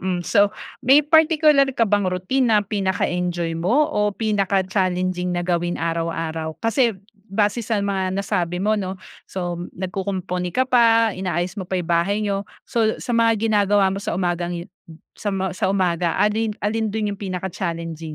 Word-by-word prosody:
mm. 185 -1 -1
So, 205 -2 +4 0.3
may 280 +4 +6
partikular 305 -2 +5
ka 230 - +4
bang 205 -2 +2
routine 230 +8 0
na 215 -2 +5
pinaka-enjoy 180 -4 -1
mo 240 - +3
o 210 0 +2
pinaka-challenging 190 -3 0
na 175 - -1
gawin 175 0 0
araw-araw. 165 -1 -3
Kasi 230 -2 +1 0.3
base 205 +3 0
sa 220 -2 -1
mga 190 -2 -1
nasabi 180 -3 -1
mo 215 +1 +2
'no, 190 -1 -3 0.3
so 175 -2 -4 0.2
nagkukumpuni 185 -1 -3
ka 260 - +3
pa, 230 -3 +4
inaayos 185 +1 -3
mo 185 - -5
pa 190 - -3
yung 175 -1 -4
bahay 175 +5 +2
niyo. 200 -1 -1 0.2
So, 225 -3 +1
sa - - -5
mga 230 -1 +4 0.2
ginagawa 205 -2 +3
mo 195 - -3
sa - - -3
umagang 175 -1 -1
yu 170 - -6 0.5
sa 205 -2 -2
ma 190 0 -1
sa 190 +2 -2
umaga, 180 -3 +1
alin 215 +1 +1
alin 220 +2 0
do'n 215 -1 -1
yung - - -17
pinaka-challenging? 170 -4 -4
190 Hz, 160 wpm, -22 LUFS, 180-215 Hz, 0.5 s, may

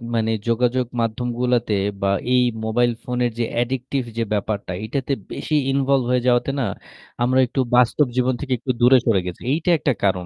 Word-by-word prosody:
মানে 110 0 +1 0.2
যোগাযোগ 125 +2 +1
মাধ্যমগুলাতে 120 0 0 0.3
বা 100 - +1 0.2
এই 125 - +5 0.2
মোবাইল 120 +2 +2
ফোনের 125 -1 -1
যে - - +2 0.2
addictive 130 +1 -2
যে 115 - +1
ব্যাপারটা 100 -2 -2
এটাতে 135 +4 -2 0.2
বেশি 155 - -3 0.2
involved 135 -2 +2
হয়ে 125 -1 +2
যাওয়াতে 120 +2 +2
না - - +1 0.6
আমরা 130 +2 +3
একটু 135 - -4 0.2
বাস্তব 125 +4 +4
জীবন 130 0 +2
থেকে 135 -3 -2
একটু 130 +1 -2
দূরে 125 +2 +7
সরে 110 -5 +3
গেছি। 90 -1 -6
এইটা 160 +4 0
একটা 140 -3 0
কারণ। 95 -2 +1
125 Hz, 170 wpm, -21 LUFS, 115-130 Hz, 0.6 s, দূরে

